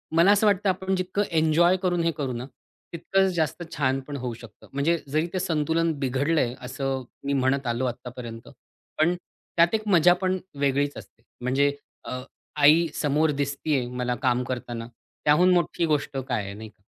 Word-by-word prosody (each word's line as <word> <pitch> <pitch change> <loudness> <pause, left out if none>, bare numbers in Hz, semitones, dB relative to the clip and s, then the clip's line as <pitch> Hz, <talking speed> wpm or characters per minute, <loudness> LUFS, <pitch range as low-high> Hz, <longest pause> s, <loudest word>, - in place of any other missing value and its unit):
मला 170 +5 +6
असं 205 +1 +4
वाटतं 200 0 +2
आपण 190 +1 0
जितकं 185 +2 -1 0.2
एन्जॉय 170 +4 +4
करून, 175 -2 +1
हे 165 - +2
करू 135 -3 -2
ना, 120 +1 -5 0.5
तितकंच 190 +3 +1
जास्त 160 +1 -1
छान 135 -2 +1
पण 145 - -5
होऊ 125 -2 -4
शकतं. 115 0 -14
म्हणजे 150 +5 +2
जरी 155 +4 0
ते 185 - 0
संतुलन 165 0 +1
बिघडलंय 135 0 +1
असं 130 +1 -3 0.2
मी 140 - 0
म्हणत 135 0 +1
आलो 120 +2 0
आत्तापर्यंत. 120 -1 -6 0.5
पण 170 +3 +3 0.4
त्यात 170 +4 +5
एक 215 -1 -3
मजा 175 -2 +6
पण 185 0 +1 0.2
वेगळीच 140 +1 +1
असते. 110 +2 -13 0.2
म्हणजे 140 +3 +2 0.3
अ, 125 - -4 0.4
आई 155 +4 +6
समोर 150 +1 +1
दिसतीये 140 -1 -1
मला 125 0 -2
काम 125 -1 +2
करताना, 120 -2 -4 0.4
त्याहून 175 +5 +5
मोठी 175 -1 +1
गोष्ट 150 -3 -1
काय 125 -5 -2
आहे, 100 - -6
नाही 110 +2 -9
का. 100 - -29
145 Hz, 170 wpm, -25 LUFS, 125-170 Hz, 0.5 s, मला